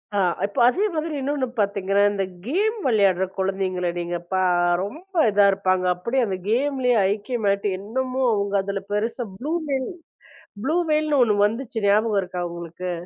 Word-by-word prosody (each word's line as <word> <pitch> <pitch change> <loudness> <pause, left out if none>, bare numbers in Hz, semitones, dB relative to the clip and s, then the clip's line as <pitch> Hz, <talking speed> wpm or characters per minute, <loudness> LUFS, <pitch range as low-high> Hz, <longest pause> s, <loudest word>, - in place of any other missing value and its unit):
ஆ, - - +2 0.3
இப்ப 200 - -4
அதே 365 +11 +2
மாதிரி 315 0 -2
இன்னொன்னு 275 -1 -1
பாத்தீங்கன்னா, 200 -1 +1
இந்தக் 195 -2 -3
கேம் 415 - 0
விளையாடுற 200 -6 +3
குழந்தைங்கள 190 -2 -1
நீங்கப் 175 0 -4
பா 185 0 +2 0.4
ரொம்ப 330 - -9 0.2
இதா 205 0 +5
இருப்பாங்க. 185 -1 0
அப்பிடியே 235 +9 -1
அந்த 190 -1 -2
கேம்லயே 255 +1 +1
ஐக்கியமாயிட்டு 205 -2 -1
என்னமோ 255 +5 -3
அவுங்க 200 -1 -1
அதுல 195 0 -4
பெருசா 225 +4 -1
ப்ளு 290 +5 -4 0.2
வெல் 275 -2 0 0.8
ப்ளு 315 +6 +1
வெல்ன்னு 305 -2 +2
ஒண்ணு 215 -3 +2
வந்துச்சு 225 0 -2
ஞாபகம் 210 0 +3
இருக்கா 180 -1 -5
உங்களுக்கு? 170 +1 -6
205 Hz, 145 wpm, -23 LUFS, 190-260 Hz, 0.8 s, இதா